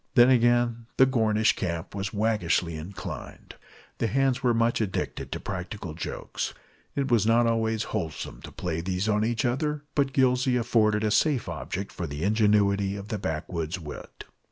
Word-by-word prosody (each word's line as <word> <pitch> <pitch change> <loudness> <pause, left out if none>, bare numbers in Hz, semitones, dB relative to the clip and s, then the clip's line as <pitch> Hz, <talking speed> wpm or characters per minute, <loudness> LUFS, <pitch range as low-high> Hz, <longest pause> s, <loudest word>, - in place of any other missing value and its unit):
Then 120 0 +7
again 120 -1 +3
the 130 - +7
Gornish 110 -4 +2
Camp 85 -3 -3
was 100 0 -3
waggishly 100 -6 +1
inclined. 90 +4 -8 0.5
The 115 - +1
hands 135 +2 +1
were 125 -3 +3
much 115 0 +2
addicted 100 -4 -3
to - - -3
practical 95 -2 -5
jokes. 80 - -4 0.4
It 135 -2 -1
was 110 -3 +4
not 115 +1 +4
always 110 -1 +1
wholesome 85 -8 -4
to - - -10
play 85 -2 -3
these 90 +3 -2
on 105 0 +2
each 115 +1 0
other, 150 +4 -1
but 140 -2 +1
Gillsey 130 -1 +3
afforded 110 -3 +2
a 105 - +1
safe 135 +2 +2
object 95 +2 -4
for 85 - -4
the 75 +2 -5
ingenuity 100 -1 +3
of 100 +1 -8
the 110 -3 -2
backwoods 80 0 -3
wit. 75 -3 -9
110 Hz, 165 wpm, -27 LUFS, 95-120 Hz, 0.5 s, Then